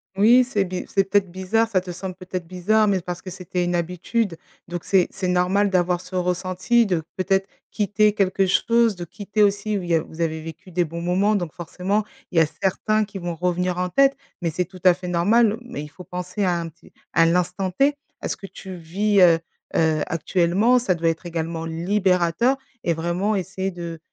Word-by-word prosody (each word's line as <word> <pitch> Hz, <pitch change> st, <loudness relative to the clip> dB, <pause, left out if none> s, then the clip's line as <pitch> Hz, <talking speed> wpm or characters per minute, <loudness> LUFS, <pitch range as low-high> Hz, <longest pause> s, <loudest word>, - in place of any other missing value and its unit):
Oui 230 Hz, +6 st, +6 dB
c'est 230 Hz, -5 st, 0 dB
bi 185 Hz, -1 st, -4 dB
c'est 195 Hz, -1 st, +1 dB
peut-être 195 Hz, -2 st, +2 dB
bizarre 190 Hz, +5 st, +1 dB
ça 195 Hz, -5 st, +1 dB
te 180 Hz, -, -10 dB
semble 185 Hz, +1 st, -5 dB
peut-être 185 Hz, -1 st, -6 dB
bizarre 205 Hz, +5 st, +2 dB
mais 195 Hz, -2 st, +1 dB
parce 180 Hz, 0 st, -6 dB
que 185 Hz, -, -7 dB
c'était 180 Hz, 0 st, -3 dB
une 175 Hz, 0 st, -1 dB
habitude, 180 Hz, +3 st, -1 dB, 0.3 s
donc 175 Hz, 0 st, -5 dB
c'est 190 Hz, -3 st, +3 dB
c'est 185 Hz, -, -4 dB
normal 185 Hz, +3 st, +2 dB
d'avoir 180 Hz, -1 st, +1 dB
ce 185 Hz, -, -10 dB
ressenti 185 Hz, +6 st, +1 dB
de 180 Hz, -5 st, 0 dB, 0.2 s
peut-être 190 Hz, +1 st, +1 dB, 0.2 s
quitter 210 Hz, 0 st, +2 dB
quelque 195 Hz, -1 st, +2 dB
chose, 230 Hz, +3 st, +3 dB
de 175 Hz, -1 st, -6 dB
quitter 205 Hz, +4 st, -3 dB
aussi 205 Hz, +1 st, +2 dB
où 200 Hz, -, -1 dB
il 175 Hz, -, -7 dB
y 170 Hz, -, +4 dB
a 160 Hz, -, +2 dB
vous 160 Hz, -, -9 dB
avez 160 Hz, -1 st, -1 dB
vécu 165 Hz, +3 st, -10 dB
des 175 Hz, 0 st, +1 dB
bons 170 Hz, +2 st, -6 dB
moments 185 Hz, +5 st, +2 dB
donc, 175 Hz, -5 st, -2 dB
forcément, 185 Hz, +5 st, -2 dB, 0.3 s
il 175 Hz, -, -4 dB
y -, -, +7 dB
a -, -, +5 dB
certains 215 Hz, +6 st, 0 dB
qui 200 Hz, -1 st, -9 dB
vont 175 Hz, -2 st, -4 dB
revenir 180 Hz, +1 st, -1 dB
en 180 Hz, 0 st, 0 dB
tête 275 Hz, +8 st, +4 dB, 0.3 s
mais 165 Hz, -, 0 dB
c'est 180 Hz, +3 st, -1 dB
tout 185 Hz, 0 st, -14 dB
à 180 Hz, -, +8 dB
fait 180 Hz, +1 st, -8 dB
normal. 210 Hz, +6 st, +3 dB
Mais 245 Hz, -9 st, -6 dB
il 150 Hz, -, -7 dB
faut 180 Hz, +4 st, -12 dB
penser 180 Hz, +3 st, -4 dB
à 175 Hz, -2 st, +1 dB
un 165 Hz, -1 st, -4 dB
petit 165 Hz, +1 st, -21 dB, 0.2 s
à 165 Hz, -, +5 dB
l'instant 180 Hz, +2 st, 0 dB
t, 275 Hz, +9 st, +2 dB, 0.3 s
à -, -, -3 dB
ce -, -, -3 dB
que -, -, -10 dB
tu 190 Hz, -1 st, -9 dB
vis, 195 Hz, +5 st, 0 dB
heu 170 Hz, -3 st, +6 dB, 0.4 s
heu, 160 Hz, -2 st, +2 dB
actuellement. 180 Hz, -, +2 dB
Ça 235 Hz, -7 st, +1 dB
doit 165 Hz, -1 st, +1 dB
être 165 Hz, +2 st, -4 dB
également 165 Hz, -1 st, -3 dB
libérateur 180 Hz, -, +1 dB, 0.3 s
et 170 Hz, -, +1 dB
vraiment 175 Hz, +6 st, -1 dB
essayer 190 Hz, 0 st, -3 dB
de 170 Hz, -2 st, -7 dB
185 Hz, 215 wpm, -23 LUFS, 175-200 Hz, 0.4 s, à